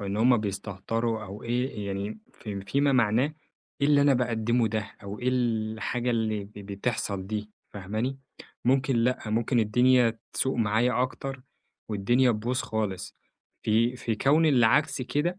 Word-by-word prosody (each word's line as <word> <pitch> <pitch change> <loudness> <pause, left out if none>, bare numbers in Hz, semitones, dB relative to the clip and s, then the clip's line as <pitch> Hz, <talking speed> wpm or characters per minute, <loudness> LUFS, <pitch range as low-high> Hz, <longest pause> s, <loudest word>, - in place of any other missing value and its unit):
أو 100 - -4
إن 100 - -2
همّ 120 +3 +5
بيستهتروا 110 +2 -2
أو 100 +2 -9
إيه، 120 -3 -2
يعني 100 +2 -4
في 100 -3 -6
في 100 +9 -1
ما 140 -1 +3
معناه، 125 +5 +2 0.5
إيه 140 - +3
اللي 145 -1 +5
أنا 140 -1 +5
باقدمه 120 -1 +1
ده 110 -1 -3
أو 100 +1 -7
إيه 125 - -1
الحاجة 120 0 -1
اللي 110 -3 0
ب 100 - -16
بتحصل 100 -1 -3
دي؟! 105 0 -4 0.2
فاهماني؟ 110 +7 -3 0.5
ممكن 130 0 +2
لأ، 125 +2 +2
ممكن 115 +2 +2
الدنيا 120 +1 +3
تسوء 130 -1 0
معايا 115 +3 +2
أكتر 135 0 -4 0.5
والدنيا 120 +5 +3
تبوظ 120 +4 -1
خالص. 105 -4 -3 0.5
في 115 +3 +2
في 115 -2 -2
كون 150 +8 +3
العكس 135 +2 +3
كده، 160 +8 -1
115 Hz, 150 wpm, -27 LUFS, 105-125 Hz, 0.5 s, همّ